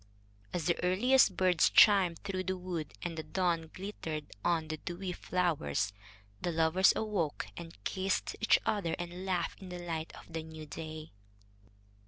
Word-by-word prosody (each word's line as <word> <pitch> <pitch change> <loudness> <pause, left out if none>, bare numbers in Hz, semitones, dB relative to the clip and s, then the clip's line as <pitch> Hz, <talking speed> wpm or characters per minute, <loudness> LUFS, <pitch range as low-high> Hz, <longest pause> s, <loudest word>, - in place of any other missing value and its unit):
As 170 -3 -2
the 170 - +1
earliest 205 +3 +4
birds 180 -3 +4
chimed 190 -5 +6
through 190 -2 -3
the 185 +1 -1
wood, 175 -4 -4
and 170 -1 -3
the 160 - -3
dawn 170 -2 0
glittered 160 -6 -5
on 170 -2 +1
the 155 0 -3
dewy 180 +3 -5
flowers, 150 - 0 0.5
the 175 - 0
lovers 165 +3 +4
awoke 200 -9 -1
and 165 -6 -9
kissed 190 - -1
each - - +6
other 190 -6 0
and 175 +2 -6
laughed 185 0 -1
in 190 - -8
the 180 - -5
light 165 -2 -4
of - - -13
the 165 - -2
new 160 -1 -9
day. 155 +1 -7
175 Hz, 160 wpm, -32 LUFS, 160-185 Hz, 0.5 s, chimed